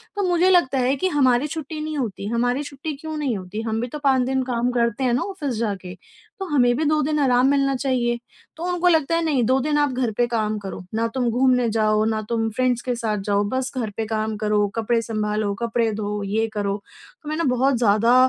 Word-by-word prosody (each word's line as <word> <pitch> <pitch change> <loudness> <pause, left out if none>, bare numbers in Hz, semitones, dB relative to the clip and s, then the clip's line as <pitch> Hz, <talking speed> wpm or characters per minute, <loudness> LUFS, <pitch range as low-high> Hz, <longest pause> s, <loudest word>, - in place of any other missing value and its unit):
तो 405 - -1
मुझे 355 +2 +3
लगता 345 -7 +3
है 255 +2 +2
कि, 375 - 0
"हमारी 270 -2 +3
छुट्टी 310 0 -5
नहीं 310 -1 -4
होती, 215 -6 -3
हमारी 245 +5 0
छुट्टी 290 +2 -6
क्यों 315 +1 -6
नहीं 265 -8 -1
होती? 190 +4 -6
हम 225 0 -2
भी 245 - -2
तो 300 +5 -7
5 265 -2 +4
दिन 265 0 0
काम 245 -1 -1
करते 235 +1 0
हैं 245 - +2
ना, 250 - +1
ऑफ़िस 315 -10 -4
जाके। 195 -5 -3 0.4
तो 385 - -3
हमें 250 -8 +3
भी 310 - 0
2 305 +1 +2
दिन 300 +1 0
आराम 255 -2 +4
मिलना 275 -1 +2
चाहिए।" 250 -3 0 0.4
तो 335 - -4
उनको 355 0 +1
लगता 320 -1 +2
है, 335 - +1
"नहीं, 280 -6 +2
2 260 +3 +3
दिन 295 +1 0
आप 290 -2 +2
घर 250 -3 0
पे 240 - +3
काम 215 -2 -1
करो। 195 -2 -7
ना 230 +1 +1
तुम 245 -2 +1
घूमने 250 -1 +3
जाओ, 215 0 +3
ना 220 -1 0
तुम 225 -1 0
फ्रेंड्स 250 +1 0
के 250 -1 -2
साथ 220 -3 -1
जाओ, 200 0 +3
बस 260 0 -1
घर 230 -4 -1
पे 220 - -1
काम 220 0 -2
करो, 210 -1 +1
कपड़े 230 +1 +1
संभालो, 210 -2 -1
कपड़े 230 -1 +1
धो, 210 0 -3
ये 220 +3 0
करो।" 200 -1 -1 0.5
तो 300 - -6
मैं 310 - -2
ना, 335 - 0
बहुत 265 +2 +2
ज़्यादा 230 +1 +4
245 Hz, 235 wpm, -22 LUFS, 220-280 Hz, 0.5 s, 5